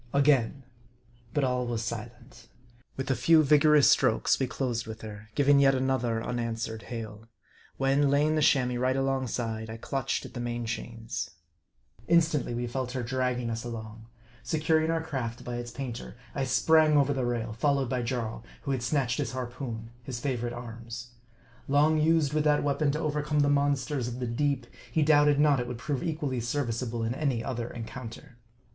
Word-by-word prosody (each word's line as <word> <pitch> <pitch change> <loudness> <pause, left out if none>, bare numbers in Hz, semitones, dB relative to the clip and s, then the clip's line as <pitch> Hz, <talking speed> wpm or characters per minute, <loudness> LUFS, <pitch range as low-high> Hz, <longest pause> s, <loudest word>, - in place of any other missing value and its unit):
Again. 140 -2 +3 0.7
But 145 +3 0
all 125 -1 0
was 115 -1 -2
silent. 120 +2 -7 0.5
With 135 0 -2
a - - +2
few 155 +6 +5
vigorous 150 0 +6
strokes, - - +3
we 130 - +1
closed 120 -4 -2
with 110 0 -7
her, 110 0 -9
giving 140 0 +5
yet 135 -1 +5
another 125 -3 0
unanswered 115 -2 -3
hail; 110 -1 -7 0.5
when, 135 +1 +3
lay 140 +1 +3
ing 155 - +2
the 155 - +1
Chamois 125 -4 +3
right 130 +1 +1
alongside, 125 -4 -1
I 110 - -6
clutched 135 +3 -2
at - - -10
the 120 - -5
main 120 0 -3
chains. 115 -2 -4 0.8
Instantly 160 -7 +2
we 120 +1 -2
felt 125 +1 -3
her 130 -2 -2
dragging 125 -1 -1
us 115 0 -3
along. 110 -1 -7 0.3
Securing 160 0 +1
our 165 0 0
craft 120 -6 -4
by 120 -1 -4
its 120 0 -5
painter, 125 -1 -6 0.2
I 135 -2 -1
sprang 155 +4 +4
over 145 0 +3
the 130 -2 -1
rail, 120 -2 -2
followed 135 +1 +1
by 125 -1 0
Jarl, 115 -2 -3 0.2
who 140 - -2
had 130 -3 -1
snatched 125 0 0
his 130 -5 -2
harpoon, 120 -3 -5
his 120 0 -6
favorite 120 -3 -2
arms. 120 0 -8 0.6
Long 150 +3 +4
used 155 -2 +3
with 155 0 +1
that 150 -1 +3
weapon 145 +1 +1
to 150 - -2
overcome 150 -1 0
the 145 - +3
monsters 140 -2 +1
of 120 +1 -5
the 125 - -2
deep, 130 +2 0 0.3
he 160 - +2
doubted 145 -1 +5
not 145 -2 +4
it 120 - -2
would 125 -1 -5
prove 135 +1 -3
equally 150 -6 -2
serviceable 120 -2 -2
in 115 +1 -1
any 130 -5 -1
other 120 -2 -3
encounter. 120 +2 -9
125 Hz, 175 wpm, -28 LUFS, 115-145 Hz, 0.8 s, vigorous